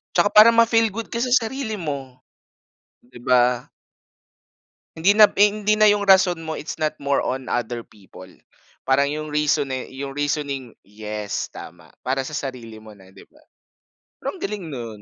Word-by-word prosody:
'Tsaka 205 - +4
para 215 +2 +9
ma-feel 230 0 +4
good 230 +2 -5
ka 235 - -2
sa 250 - -2
sarili 245 -1 0
mo, 140 -8 -6 0.8
'di 120 0 -15
ba. 125 -1 +2 1.3
Hindi 185 +5 +4
na 210 0 +7
b - - -22 0.2
hindi 210 0 0
na 215 - +5
'yong 205 -1 +3
rason 180 -3 +5
mo, 160 -1 -5
it's 155 +1 -7
not 155 0 -1
more 140 0 0
on 130 0 -3
other 120 -1 -3
people. 95 -3 -15 0.6
Parang 135 +1 +2
'yong 155 +2 -4
reason, 150 -2 0
eh, 130 -1 -4
'yong 135 +1 -7
reasoning, 140 -4 -3
yes 105 0 -6
tama, 80 -1 -12
para 130 +1 -2
sa 150 - -8
sarili 120 -6 -6
mo 110 -1 -14
na, 95 -1 -19
'di - - -17
ba. 300 - -26 0.8
Pero, - - -5
ang 375 - -13
galing 205 -2 -4
no'n. 120 -8 -7
140 Hz, 170 wpm, -22 LUFS, 120-200 Hz, 1.3 s, para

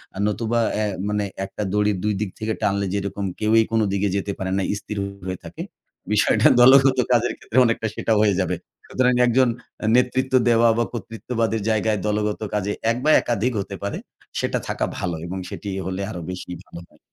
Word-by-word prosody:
আ - - -9
নতুবা 115 +2 0
অ্যা 110 - 0 0.2
মানে 105 0 0 0.2
১ 95 - -7
টা 105 - -1
দড়ির 105 -1 +2
২ 105 - +1
দিক 100 -4 -2
থেকে 110 0 -1
টানলে 100 0 +1
যেরকম 100 0 -2
কেউই 110 +1 +4
কোন 115 -1 +2
দিকে 100 +1 +1
যেতে 100 0 -1
পারে 95 0 -2
না, - - +1 0.2
স্থির 105 +1 -7 0.3
হয়ে 95 -1 -4
থাকে। - - -8 0.5
বিষয়টা 105 +1 +4
দলগত 130 +1 +7
কাজের 120 0 +3
ক্ষেত্রে 115 - -5
অনেকটা 115 -1 0
সেটা 115 - 0
হয়ে 105 -2 +4
যাবে। - - -1 0.3
সুতরাং 125 -1 +2
১ 120 - +2
জন 130 -2 +5 0.3
অ্যা 110 - -3
নেতৃত্ব 130 +1 +1 0.2
দেওয়া 115 0 +5
বা 120 - +2
কর্তৃত্ববাদের 115 -1 -2
জায়গায় 110 -1 +1
দলগত 105 0 -1
কাজে 105 -1 -1 0.2
১ 115 - -1
বা 155 - +5
একাধিক 120 +2 0
হতে 100 0 -7
পারে। 100 - -2 0.4
সেটা - - 0
থাকা - - -1
ভালো 85 -2 -2
এবং 95 +2 -5
সেটি 100 - -6 0.2
হলে 95 +1 -3
আরো 90 - -6
বেশি 90 -1 -7
ভালো 85 - -10
হয়। - - -24
105 Hz, 195 wpm, -22 LUFS, 100-115 Hz, 0.5 s, দলগত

